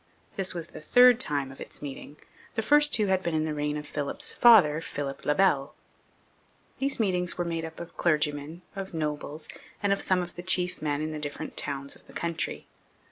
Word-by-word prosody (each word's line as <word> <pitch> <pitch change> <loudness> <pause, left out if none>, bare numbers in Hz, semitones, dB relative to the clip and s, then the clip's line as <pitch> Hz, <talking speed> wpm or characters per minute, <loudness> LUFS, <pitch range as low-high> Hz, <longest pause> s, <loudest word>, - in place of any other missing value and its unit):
This 190 -2 -2
was 170 -1 -5
the - - -10
third 245 +8 +6
time 140 - +1
of 135 - -13
its - - -5
meeting; 145 +1 -8 0.4
the 220 - 0
first 295 +4 +5
two 215 - +3
had 190 -1 +2
been 170 -3 -2
in 155 0 +1
the 155 - -2
reign 150 0 -1
of 150 - -6
Philip's 145 -1 -3
father, 180 -11 +6
Philip 140 -3 -5
le 150 - +3
Bel. 150 -8 +2 1.0
These 275 -1 0
meetings 180 -5 0
were 175 - -1
made 165 -1 -2
up 160 0 -9
of 170 0 -9
clergymen, 150 +1 0
of 195 -2 -6
nobles, 150 0 -4 0.4
and 200 -1 +3
of 200 - -2
some 185 -1 +2
of 175 - -8
the 175 - -7
chief 180 -1 0
men 150 -1 -1
in 155 - -3
the 155 - -5
different 145 -1 -5
towns 140 -1 -3
of - - -20
the - - -15
country. 170 -1 -3
165 Hz, 205 wpm, -28 LUFS, 150-185 Hz, 1.0 s, third